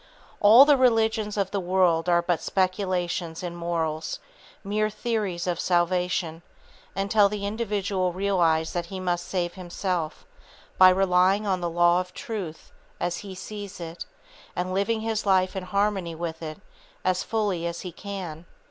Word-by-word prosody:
All 225 +6 +9
the 290 -1 +5
religions 225 -4 +2
of 195 -2 0
the 200 - -1
world 180 -2 +2
are 170 0 +4
but 175 -1 0
speculations 185 -3 -1
in 175 -1 -4
morals, 165 -2 -2 0.5
mere 215 +2 0
theories 210 -5 -2
of 175 -2 -1
salvation, 175 -2 0 0.5
until 200 +1 +3
the 205 -1 -4
individual 200 -4 -1
realize 175 -4 +1
that 175 -1 -2
he 190 +1 -6
must 175 -1 -2
save 175 -2 -2
himself 180 -2 -3 0.5
by 185 0 +10
relying 190 +2 +3
on 190 -3 0
the 175 - -1
law 175 +1 +4
of 180 0 -6
truth, 210 - -6 0.3
as 175 0 -1
he 195 -2 -8
sees 200 +1 -8
it, 165 0 -7 0.5
and 185 +1 -2
living 220 +4 0
his 220 -1 -2
life 185 0 +3
in 190 -1 -4
harmony 195 -3 0
with 165 0 -5
it, 155 -1 -6 0.5
as 185 -1 +2
fully 200 -6 -1
as 170 0 -5
he 180 - -6
can. 175 -3 -7
185 Hz, 155 wpm, -26 LUFS, 175-200 Hz, 0.5 s, by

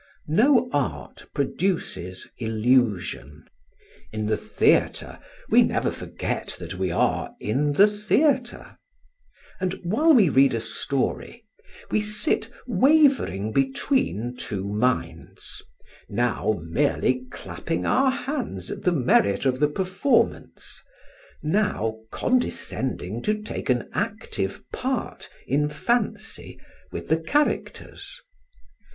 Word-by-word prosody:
No 245 - +4
art 140 -3 -3
produces 140 - -2
illusion; 110 - 0 0.7
in 110 -1 -3
the 110 0 +1
theatre - - +1 0.3
we - - +7
never - - +1
forget - - -4
that 85 +1 -7
we 95 0 -2
are 85 - 0
in 145 +7 0
the 195 +8 +7
theatre; 240 +5 0 0.8
and 185 -1 -1
while 230 - +3
we 210 -7 +6
read 135 -3 +4
a - - 0
story, 140 - -2 0.5
we 215 - +2
sit 210 +1 0 0.2
wavering 265 - +3
between 135 - 0
two 100 -5 -4
minds, 105 -7 -2 0.5
now 115 -3 0
merely 125 - 0
clapping 90 -6 -4
our 270 +1 +3
hands 260 - -4
at - - -6
the 180 - +2
merit 125 - +2
of 130 -1 +1
the 150 0 +3
performance, 190 - -1 0.6
now 155 - 0
condescending 130 - -1
to 215 +7 0
take 210 - -6
an 125 -2 +1
active - - -3
part - - -3 0.2
in 150 +3 +1
fancy 215 +10 -2 0.3
with - - -6
the 160 - +2
characters. 295 - -2
145 Hz, 105 wpm, -24 LUFS, -, 0.8 s, we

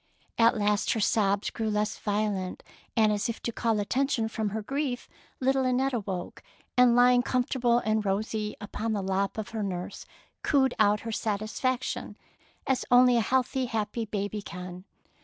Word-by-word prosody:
At 230 0 +5
last 210 0 +1
her 225 - -2
sobs 200 -1 +1
grew 220 -2 -2
less 210 +1 -1
violent, 205 -3 -2 0.3
and 215 -1 +5
as 205 +2 -1
if 230 - -4
to 235 - -1
call 225 -2 0
attention 235 +1 0
from 220 -2 -2
her 215 +1 -4
grief, 275 0 -2 0.3
little 265 +1 +2
Annette 255 +1 +1
awoke, 190 -6 -4 0.3
and 250 -1 +6
lying 245 0 +6
comfortable 245 -1 +1
and 215 -2 +1
rosy 210 +2 -2
upon 215 +2 -3
the 200 -2 -1
lap 195 +2 -1
of 220 - -4
her 220 -1 -4
nurse, 180 -3 -5 0.3
cooed 265 -3 +2
out 210 0 +4
her 225 - -5
satisfaction 220 +4 -2 0.5
as 265 -2 +1
only 250 0 +6
a 235 - +4
healthy, 260 +2 0
happy 225 0 -2
baby 205 0 -3
can. 180 0 -8
220 Hz, 160 wpm, -28 LUFS, 205-245 Hz, 0.5 s, and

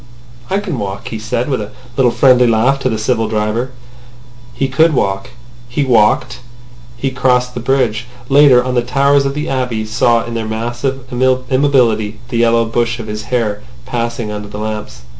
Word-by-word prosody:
"I 195 - +1
can 190 - -3
walk," 100 -1 -5
he 110 - -5
said, 115 +3 -2
with 130 -6 -1
a 105 - -6 0.3
little 130 -2 +4
friendly 125 -2 +5
laugh 120 +5 +2
to 130 - 0
the 110 - -1
civil 115 +1 0
driver. 110 +3 -1 0.8
He 135 - -1
could 155 +4 +3
walk. 95 -2 -1 0.4
He 135 +4 0
walked. 120 0 +2 0.6
He 135 +2 -2
crossed 125 -1 +1
the 125 - -4
bridge. 120 -3 0 0.2
Later 135 -3 +6
on 130 0 -2
the 120 - +2
towers 140 +3 +2
of 135 - -4
the 150 +1 -3
Abbey 125 -5 -2
saw 115 +1 +2
in 120 - -6
their 115 -1 -3
massive 120 +4 -3
immobility 125 -4 +1
the 120 - -2
yellow 115 0 +3
bush 120 +1 -1
of 115 - -6
his 105 0 -6
hair 110 -3 -1 0.2
passing 120 -2 -3
under 105 0 -6
the 105 0 -8
lamps. 105 - -5
120 Hz, 180 wpm, -15 LUFS, 110-130 Hz, 0.8 s, Later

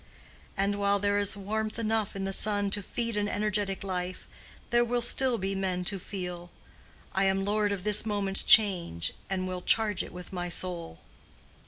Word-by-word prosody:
And 200 +1 0
while 200 0 +2
there 205 0 +1
is 205 0 +1
warmth 215 +2 -3
enough 220 -2 -1
in 195 - -3
the 195 0 -2
sun 205 -1 0
to 205 - 0
feed 230 +3 -3
an 205 0 0
energetic 205 -2 -1
life, 180 -1 -4 0.4
there 240 0 +4
will 240 0 0
still 255 0 +3
be 195 0 -2
men 185 -2 -2
to 195 +1 +1
feel, 180 -2 -6 0.6
"I 195 0 +2
am 195 0 +1
lord 205 0 +1
of 195 -3 -3
this 210 0 +2
moment's 200 -3 +2
change, 175 - +4 0.2
and 185 -1 -2
will 185 -1 -4
charge 210 -1 +2
it - - -7
with 180 +2 -10
my 175 -1 -3
soul." 175 - -2
200 Hz, 180 wpm, -29 LUFS, 185-210 Hz, 0.6 s, there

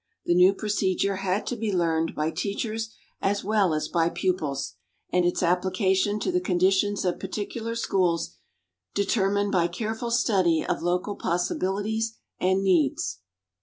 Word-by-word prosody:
The 175 - +3
new 180 +3 +6
procedure 200 -2 0
had 195 +1 -1
to 245 - -2
be 220 -2 -2
learned 165 -3 0
by 155 +1 0
teachers 215 +6 -3 0.3
as 200 +1 0
well 205 -3 +2
as 155 -1 -1
by 165 -1 +1
pupils, 155 -8 -2 0.4
and 180 -1 +3
its 175 +1 +1
application 190 +3 +1
to - - 0
the 360 0 +1
conditions 190 - +2
of 180 - 0
particular 230 +2 -4
schools 175 - 0 0.6
determined 200 0 +1
by 175 -3 +3
careful 220 +6 -3
study 190 -9 +2
of - - -1
local 180 +4 -1
possibilities 205 +6 -1 0.2
and 190 +1 +2
needs. 150 - +1
190 Hz, 140 wpm, -26 LUFS, 175-205 Hz, 0.6 s, new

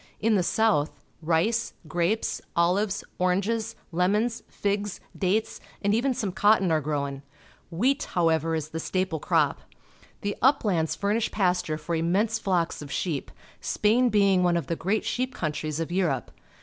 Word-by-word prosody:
In 225 +1 +2
the 200 - +3
south, 190 -5 +1 0.2
rice, 170 +8 +1
grapes, 175 +7 0
olives, 190 +4 +1 0.2
oranges, 200 +5 0 0.2
lemons, 210 +7 +1
figs, 205 0 -2 0.2
dates, 200 +3 0 0.2
and 205 +1 +2
even 250 +3 +1
some 215 -6 -2
cotton 205 -2 +3
are 155 -1 +2
gro^\n. 140 -2 -2 0.5
Vilieat, 255 - +1
however, 165 -2 +1
is 155 -1 -3
the 160 - -4
staple 185 -1 -1
crop. - - +1 0.6
The 205 0 -2
uplands 200 - +2
fur 200 +5 0
nish 230 0 0
pasture 180 -6 0
for 165 +2 -5
immense 190 +7 +1
flocks 175 -5 0
of 145 -2 -8
sheep, 155 -2 -2 0.3
Spain 240 +4 +2
being 200 -3 +4
one 175 -1 +3
of 165 - -2
the 165 - -2
great 195 +6 -1
sheep 255 +1 -2
countries 155 -1 -3
of 165 +1 -3
Europe. 165 - 0
185 Hz, 150 wpm, -26 LUFS, 165-215 Hz, 0.6 s, being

